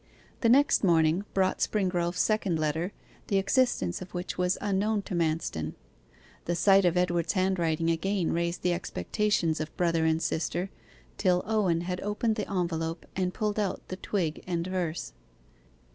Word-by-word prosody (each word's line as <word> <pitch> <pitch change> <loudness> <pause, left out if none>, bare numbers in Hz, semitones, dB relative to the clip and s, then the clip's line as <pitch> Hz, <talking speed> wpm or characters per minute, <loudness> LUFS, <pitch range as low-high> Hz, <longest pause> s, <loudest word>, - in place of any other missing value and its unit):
The 230 - +2
next 280 +1 +5
morning 170 +1 +3
brought 190 -1 +2
Springrove's 180 -4 0
second 210 -6 +1
letter, 155 +4 -1 0.4
the 200 - +2
existence 195 - +1
of 185 0 -9
which 175 +1 -3
was 180 +1 +1
unknown 205 +1 0
to 195 - -7
Manston. 155 - -1 0.7
The 175 - 0
sight 195 +2 +5
of 175 0 +2
Edward's 175 -2 +1
handwriting 170 -4 +1
again 180 +2 0
raised 170 +1 -1
the 180 - +2
expectations 170 - 0
of 155 - -6
brother 165 -2 +2
and 160 0 +2
sister, 170 +3 -2 0.5
till 180 -2 +2
Owen 190 -6 +1
had 180 +1 -3
opened 210 +2 0
the 210 - -4
envelope 165 -3 -2
and 185 -1 0
pulled 210 +2 -1
out 200 -3 -2
the 185 - -3
twig 180 -4 -2
and 170 -2 -1
verse. 175 - -3
180 Hz, 155 wpm, -28 LUFS, 165-195 Hz, 0.7 s, next